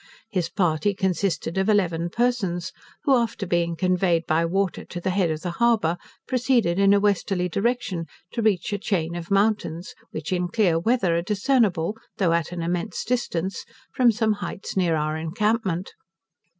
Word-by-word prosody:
His 180 Hz, -5 st, -1 dB
party 180 Hz, +1 st, +1 dB
consisted 190 Hz, -3 st, -1 dB
of 190 Hz, +2 st, +1 dB
eleven 175 Hz, -5 st, +1 dB
persons, 195 Hz, -6 st, 0 dB, 0.3 s
who, 280 Hz, -3 st, +4 dB
after 230 Hz, -4 st, -1 dB
being 170 Hz, -1 st, 0 dB
conveyed 180 Hz, -2 st, +1 dB
by 160 Hz, +2 st, +2 dB
water 190 Hz, +1 st, -1 dB
to 175 Hz, -, -7 dB
the 185 Hz, +2 st, -1 dB
head 185 Hz, -2 st, +1 dB
of 155 Hz, 0 st, -3 dB
the 175 Hz, -, -3 dB
harbour, 215 Hz, -4 st, +2 dB, 0.3 s
proceeded 245 Hz, -8 st, +2 dB
in 200 Hz, 0 st, +5 dB
a 200 Hz, -, +5 dB
westerly 195 Hz, -2 st, +1 dB
direction, 195 Hz, -4 st, -1 dB, 0.2 s
to 235 Hz, -, -2 dB
reach 215 Hz, -1 st, +1 dB
a 205 Hz, -, -1 dB
chain 170 Hz, -5 st, -1 dB
of 170 Hz, -1 st, -6 dB
mountains, 200 Hz, -4 st, 0 dB, 0.2 s
which 155 Hz, +3 st, -4 dB
in 180 Hz, -1 st, 0 dB
clear 175 Hz, -4 st, +2 dB
weather 195 Hz, -3 st, +2 dB
are -, -, +1 dB
discernible, 210 Hz, -2 st, +1 dB, 0.2 s
though 175 Hz, -4 st, +2 dB
at 170 Hz, -1 st, 0 dB
an 175 Hz, -1 st, -4 dB
immense 175 Hz, +5 st, -2 dB
distance, 190 Hz, -7 st, -2 dB, 0.3 s
from 245 Hz, -2 st, +5 dB
some 220 Hz, -1 st, +1 dB
heights 185 Hz, +1 st, -5 dB
near 175 Hz, -4 st, +2 dB
our 155 Hz, 0 st, -1 dB
encampment. 190 Hz, +2 st, -1 dB
185 Hz, 165 wpm, -24 LUFS, 170-210 Hz, 0.3 s, in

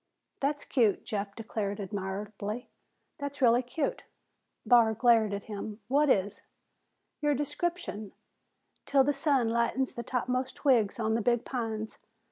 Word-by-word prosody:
"That's 290 Hz, +1 st, -1 dB
cute," 225 Hz, -7 st, +2 dB
Jeff 200 Hz, -4 st, -3 dB
declared 210 Hz, -3 st, -3 dB
admiringly. 205 Hz, +3 st, -5 dB, 0.5 s
"That's 285 Hz, 0 st, -5 dB
really 245 Hz, -2 st, +5 dB
cute!" 260 Hz, +4 st, -2 dB, 0.6 s
Barr 230 Hz, -3 st, +5 dB
glared 225 Hz, -2 st, +4 dB
at 200 Hz, 0 st, -3 dB
him. 210 Hz, 0 st, -6 dB
"What 290 Hz, +2 st, +3 dB
is?" 205 Hz, -3 st, +1 dB, 0.8 s
"Your 295 Hz, -1 st, +2 dB
description. 290 Hz, -, -3 dB, 0.8 s
''Til 275 Hz, -2 st, +4 dB
the 290 Hz, -, +2 dB
sun 275 Hz, -5 st, +2 dB
lightens 235 Hz, +3 st, 0 dB
the 235 Hz, -, -5 dB
topmost 255 Hz, +1 st, -2 dB
twigs 235 Hz, -7 st, +2 dB
on 220 Hz, -1 st, +1 dB
the 230 Hz, -, +1 dB
big 240 Hz, +1 st, +1 dB
pines.' 220 Hz, -3 st, -4 dB
235 Hz, 130 wpm, -30 LUFS, 210-265 Hz, 0.8 s, really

